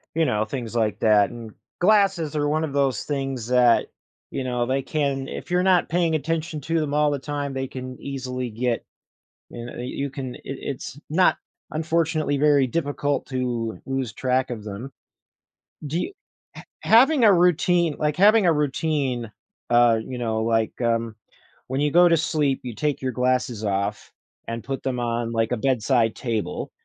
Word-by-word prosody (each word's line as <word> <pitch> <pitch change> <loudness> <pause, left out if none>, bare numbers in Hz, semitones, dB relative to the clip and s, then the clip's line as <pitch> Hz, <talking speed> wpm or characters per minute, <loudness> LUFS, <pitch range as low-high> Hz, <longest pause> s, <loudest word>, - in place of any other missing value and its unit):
you 165 - +3
know, 110 -6 +1
things 120 -1 -5
like 110 -2 0
that, 105 -2 +4
and 115 -2 -9 0.3
glasses 195 -5 +3
are 145 -1 +1
one 155 +1 +1
of 150 -3 -3
those 135 -5 +1
things 135 -5 -3
that, 125 -1 +4 0.4
you 135 - -3
know, 125 -1 -1
they 135 +2 0
can 140 -2 -1
if - - -7
you're 180 0 +2
not 185 -2 +3
paying 165 -1 +1
attention 155 +1 -2
to 165 +4 0
them 150 -2 -2
all 150 0 +3
the 145 - -2
time, 145 0 -4
they 135 0 -3
can 130 0 -7
easily 130 -2 -4
get, 115 +1 -1 0.7
you 120 - -7
kn 120 - -8
you 140 +2 -3
can 130 -2 -6
it - - -12
it's 135 0 -6
not, 180 +4 +4 0.3
unfortunately, 160 -2 0
very 145 -2 +4
difficult 145 0 -1
to 120 -4 -2
lose 135 -3 -2
track 130 +1 0
of 115 -4 -5
them. 110 +6 -7 1.0
Do 155 +4 -2
y 395 - -4 0.4
h - - -10 0.2
having 255 +3 +5
a 210 - +7
routine 175 -2 +3
like, 150 -1 0
having 205 +1 +5
a 170 - +5
routine, 140 -5 -1 0.4
uh, 120 -1 +5
you 125 -1 -6
know, 110 -2 -1
like, 115 -1 +1
um, 115 -1 0 0.5
when 130 +2 -1
you 150 0 +2
go 175 +1 +7
to 170 - +4
sleep, 150 -3 0
you 120 -3 -5
take 150 -3 -1
your 130 - 0
glasses 125 -3 0
off 100 +1 -2 0.4
and 115 0 -4
put 135 0 -4
them 125 -2 -1
on, 120 -1 -2
like, 115 -1 0
a - - +1
bedside 120 -2 +1
table. 115 -4 -3
135 Hz, 175 wpm, -24 LUFS, 120-155 Hz, 1.0 s, a